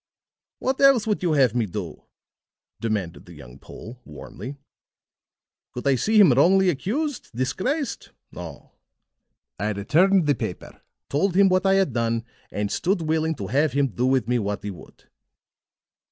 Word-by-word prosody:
"What 260 Hz, +1 st, -2 dB
else 270 Hz, -5 st, +5 dB
would 210 Hz, -2 st, -1 dB
you 175 Hz, -3 st, +1 dB
have 130 Hz, -6 st, +3 dB
me 120 Hz, -3 st, 0 dB
do?" 90 Hz, -4 st, -7 dB, 0.7 s
demanded 100 Hz, -8 st, -3 dB
the 85 Hz, -, -12 dB
young 65 Hz, -2 st, -13 dB
Pole, 120 Hz, -, -11 dB
warmly. 75 Hz, -, -9 dB, 1.2 s
"Could 125 Hz, -, -7 dB
I 140 Hz, -, +4 dB
see 215 Hz, -, +2 dB
him 195 Hz, -8 st, +7 dB
wrongfully 180 Hz, +8 st, +4 dB
accused, 255 Hz, -, -3 dB
disgraced? 205 Hz, -, -2 dB, 0.2 s
No. -, -, -10 dB, 0.9 s
I 105 Hz, +2 st, -1 dB
returned 170 Hz, -, +3 dB
the 145 Hz, -, +3 dB
paper, 110 Hz, -9 st, -7 dB, 0.3 s
told 175 Hz, +6 st, 0 dB
him 195 Hz, 0 st, +5 dB
what 185 Hz, +1 st, +2 dB
I 195 Hz, -, +4 dB
had 195 Hz, -1 st, +1 dB
done, 115 Hz, -1 st, -1 dB, 0.2 s
and 105 Hz, 0 st, -3 dB
stood 185 Hz, -1 st, 0 dB
willing 160 Hz, 0 st, 0 dB
to 100 Hz, -, -6 dB
have 140 Hz, +8 st, +1 dB
him 140 Hz, -1 st, +1 dB
do 125 Hz, +3 st, -1 dB
with 130 Hz, -4 st, +1 dB
me 125 Hz, 0 st, +1 dB
what 105 Hz, -1 st, -3 dB
he 105 Hz, -, -4 dB
would." 90 Hz, -, -15 dB
135 Hz, 155 wpm, -24 LUFS, -, 1.2 s, him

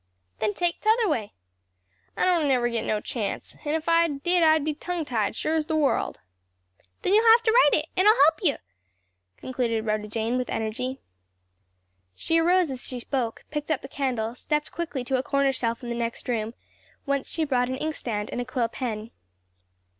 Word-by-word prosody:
"Then 210 Hz, -1 st, 0 dB
take 350 Hz, -1 st, -1 dB
t'other 440 Hz, +1 st, +3 dB
way." 225 Hz, -, -1 dB, 0.8 s
"I -, -, +2 dB
don't 345 Hz, -5 st, +3 dB
never 250 Hz, -3 st, +3 dB
git 230 Hz, -1 st, -2 dB
no 210 Hz, -1 st, 0 dB
chance; 215 Hz, -3 st, -4 dB
and 295 Hz, +1 st, -1 dB
if 320 Hz, 0 st, -3 dB
I 335 Hz, 0 st, +4 dB
did 335 Hz, +4 st, +1 dB
I'd 315 Hz, -2 st, +4 dB
be 310 Hz, -, 0 dB
tongue 340 Hz, +2 st, -4 dB
tied, 225 Hz, -6 st, -1 dB
sure 310 Hz, -, -1 dB
as 315 Hz, -1 st, 0 dB
the 320 Hz, -, 0 dB
world." 295 Hz, -3 st, +1 dB, 0.8 s
"Then 380 Hz, -, +2 dB
you'll 445 Hz, +2 st, +6 dB
have 465 Hz, +1 st, +7 dB
to 445 Hz, -, +3 dB
write 440 Hz, -11 st, +5 dB
it, -, -, -15 dB
and 375 Hz, +3 st, +3 dB
I'll 430 Hz, -, +8 dB
help 315 Hz, -5 st, +5 dB
you!" 310 Hz, -8 st, +2 dB, 0.8 s
concluded 235 Hz, -4 st, -2 dB
Rhoda 215 Hz, -1 st, -1 dB
Jane 225 Hz, +3 st, -1 dB
with 250 Hz, -, -3 dB
energy. 250 Hz, +4 st, -3 dB, 1.1 s
She 330 Hz, -, +1 dB
arose 350 Hz, -1 st, +3 dB
as 260 Hz, -1 st, -6 dB
she 250 Hz, -, -5 dB
spoke, 240 Hz, -2 st, -3 dB
picked 300 Hz, 0 st, -4 dB
up 310 Hz, -4 st, 0 dB
the -, -, -6 dB
candle, 250 Hz, -5 st, -2 dB
stepped 300 Hz, +4 st, -2 dB
quickly 315 Hz, -6 st, -4 dB
to 260 Hz, +1 st, 0 dB
a -, -, 0 dB
corner 275 Hz, +1 st, +1 dB
shelf 235 Hz, -1 st, -2 dB
in 240 Hz, -, -5 dB
the -, -, -1 dB
next 235 Hz, 0 st, -3 dB
room, 230 Hz, -1 st, -2 dB, 0.5 s
whence 280 Hz, -1 st, -1 dB
she 325 Hz, -2 st, 0 dB
brought 250 Hz, -3 st, +1 dB
an 260 Hz, -, -2 dB
inkstand 235 Hz, -9 st, -3 dB
and 245 Hz, -, -2 dB
a -, -, -4 dB
quill 250 Hz, -2 st, -1 dB
pen. 225 Hz, -3 st, -4 dB
270 Hz, 195 wpm, -26 LUFS, 235-320 Hz, 1.1 s, I'll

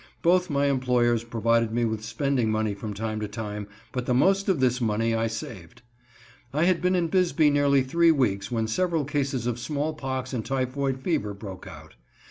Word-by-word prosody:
Both 180 Hz, +1 st, +3 dB
my 140 Hz, -1 st, +1 dB
employers 125 Hz, -4 st, +2 dB
provided 115 Hz, -1 st, +1 dB
me 120 Hz, +1 st, +1 dB
with 110 Hz, -1 st, -2 dB
spending 130 Hz, 0 st, 0 dB
money 110 Hz, -1 st, 0 dB
from 105 Hz, +1 st, -6 dB
time 110 Hz, +1 st, -3 dB
to 105 Hz, -, -3 dB
time, 105 Hz, -1 st, -5 dB, 0.2 s
but 125 Hz, -1 st, -4 dB
the 125 Hz, -, +2 dB
most 195 Hz, +9 st, +3 dB
of 185 Hz, -6 st, +2 dB
this 125 Hz, -1 st, +1 dB
money 115 Hz, 0 st, +1 dB
I 115 Hz, 0 st, +1 dB
saved. 110 Hz, -4 st, -8 dB, 0.7 s
I 150 Hz, +3 st, +1 dB
had 180 Hz, 0 st, +2 dB
been 180 Hz, +1 st, +2 dB
in 175 Hz, -2 st, +1 dB
Bisbee 170 Hz, -4 st, +3 dB
nearly 140 Hz, -2 st, +3 dB
three 170 Hz, +6 st, +3 dB
weeks 115 Hz, -11 st, +1 dB
when 115 Hz, -2 st, -1 dB
several 165 Hz, +5 st, 0 dB
cases 135 Hz, -4 st, -1 dB
of 120 Hz, -1 st, -2 dB
smallpox 135 Hz, -2 st, -3 dB
and 115 Hz, -3 st, -2 dB
typhoid 135 Hz, +1 st, -1 dB
fever 145 Hz, -, -1 dB
broke 100 Hz, -2 st, -9 dB
out. 80 Hz, -3 st, -12 dB
125 Hz, 185 wpm, -26 LUFS, 110-145 Hz, 0.7 s, Both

